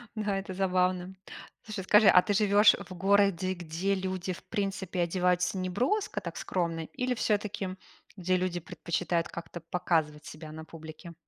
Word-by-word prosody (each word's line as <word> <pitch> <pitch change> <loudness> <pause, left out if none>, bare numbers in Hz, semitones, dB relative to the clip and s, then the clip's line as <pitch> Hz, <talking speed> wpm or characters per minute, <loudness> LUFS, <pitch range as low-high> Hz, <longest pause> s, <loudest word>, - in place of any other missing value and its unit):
Да, 205 -2 -1
это 190 -1 -6
забавно! 185 -1 0 0.5
Слушай, 215 -3 -5
скажи, 210 +2 +6
а 180 -1 +8
ты 205 - -1
живешь 205 0 +6
в 185 - -8
городе, 195 -1 +2
где 175 +3 -2
люди, 185 -1 -3
в - - -12
принципе, 195 -4 -2
одеваются 180 +1 +1
неброско, 250 - -1
так, - - -7
скромно, 165 -3 -2
или 250 0 -1
всё-таки 210 -4 -1 0.5
где 185 0 +1
люди 180 -1 -1
предпочитают 170 +1 -2
как-то 170 0 -8
показывать 160 -3 -1
себя 155 0 -9
на 160 0 -8
публике? 160 +2 -10
185 Hz, 150 wpm, -29 LUFS, 170-200 Hz, 0.5 s, а